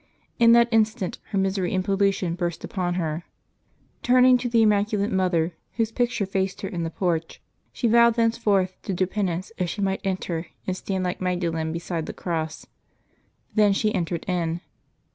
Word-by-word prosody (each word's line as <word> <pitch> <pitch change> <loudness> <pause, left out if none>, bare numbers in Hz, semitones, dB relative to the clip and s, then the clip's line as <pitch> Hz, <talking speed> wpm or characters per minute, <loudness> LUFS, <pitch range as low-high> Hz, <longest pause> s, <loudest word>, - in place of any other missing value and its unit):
In 230 -1 +7
that 235 0 +6
instant 215 -4 +1
her 200 - -2
misery 190 -1 0
and 185 0 0
pollution 195 -3 +1
burst 175 -1 -3
upon 180 -2 -2
her. 165 -2 -2 0.8
Turning 255 +1 +6
to 245 - -2
the 230 -1 +4
Immaculate 210 0 +2
Mother, 180 -3 +1 0.2
whose 225 -1 0
picture 240 -3 0
faced 190 0 -2
her 195 - -3
in 175 -3 -4
the 165 - -2
porch, 165 -1 -2 0.3
she 240 - -1
vowed 235 0 +5
thenceforth 220 -5 +1
to 195 - -3
do 185 - +2
penance 185 -1 -2
if 180 -2 0
she 205 - -4
might 195 0 0
enter 180 -3 -2 0.2
and 185 - -1
stand 190 0 -3
like 180 0 -3
Magdalen 170 -3 -1
beside 165 -1 -4
the - - -5
Cross. 160 -2 -4 0.9
Then 210 -2 +4
she 215 +2 +1
entered 170 -1 -2
in. 170 -2 -1
190 Hz, 170 wpm, -24 LUFS, 175-215 Hz, 0.9 s, In